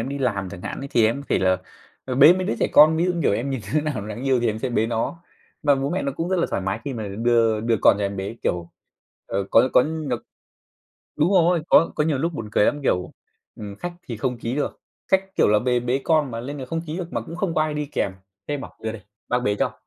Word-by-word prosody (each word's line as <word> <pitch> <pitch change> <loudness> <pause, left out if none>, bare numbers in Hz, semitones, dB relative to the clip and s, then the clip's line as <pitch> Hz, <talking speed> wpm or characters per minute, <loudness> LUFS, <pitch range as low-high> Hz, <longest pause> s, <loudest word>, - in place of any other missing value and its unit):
em 115 - -3
đi 140 +1 -4
làm 100 -8 -1
chẳng 90 - -9
hạn - - -5
thì 115 -2 +4
em 115 +5 -1
có - - -17
thể - - +2
là, 95 0 +3 0.5
ờ, 130 - -3
bế 150 +5 +8
mấy 185 +1 -2
đứa 115 - -1
trẻ - - +2
con, 155 +2 +7
ví 165 - +2
dụ, 180 - +1
như 170 - -3
kiểu, - - +3
em 120 +7 -1
nhìn 135 -3 -2
đứa 155 - +4
nào 140 -9 -3
đáng 110 +4 -6
yêu 130 -2 +2
thì 120 - +1
em 110 -1 -1
sẽ 130 - -2
bế 110 -2 +1
nó. 115 +9 -3 0.4
Mà 145 -2 +4
bố 135 +1 -2
mẹ 185 +3 -1
nó 140 - -2
cũng 165 +5 -3
rất 185 - +1
là 170 - +2
thoải - - -1
mái 95 +3 -2
khi 140 - -3
mà 110 -4 -5
đưa 115 +1 +2
đưa 115 +1 +1
con - - +6
cho 105 - -1
em 100 0 -3
bế, 100 +4 -5
kiểu, 85 -1 -2 0.6
ờ, 100 0 -2
có 120 +3 +5
có - - +6
nh 155 0 -4 1.1
đúng 155 +4 +2
rồi, 175 -3 +4
có 165 - +5
có 150 - +1
nhiều 150 -3 0
lúc 165 +5 -1
buồn 115 -8 -6
cười 105 - +4
lắm, 145 - +1
kiểu, 90 -9 0 0.4
ừm, 100 -2 -7
khách 175 +10 -5 0.2
thì 120 - -4
không 125 +2 -2
ký 115 +2 -3
được, 150 - -3 0.3
khách, 190 0 +1
kiểu - - +4
là, 105 0 +4
bề 125 +1 +1
bế 125 +2 0
con 155 -4 +2
mà 115 -1 -4
lên 140 +4 -6
là 130 - -5
không 165 +5 -2
ký 155 +1 -4
được 175 -1 -6
mà - - -1
cũng 165 - -8
không 180 -2 -1
có - - +2
ai 155 -1 -2
đi 150 0 -2
kèm, 95 - -1 0.4
thế 145 - -1
em 145 - -4
bảo: - - -9
"Đưa 110 0 -2
đây, 110 -3 -9 0.3
bác 125 - +2
bế 105 -4 0
cho." - - -1
130 Hz, 290 wpm, -23 LUFS, 110-155 Hz, 1.1 s, bế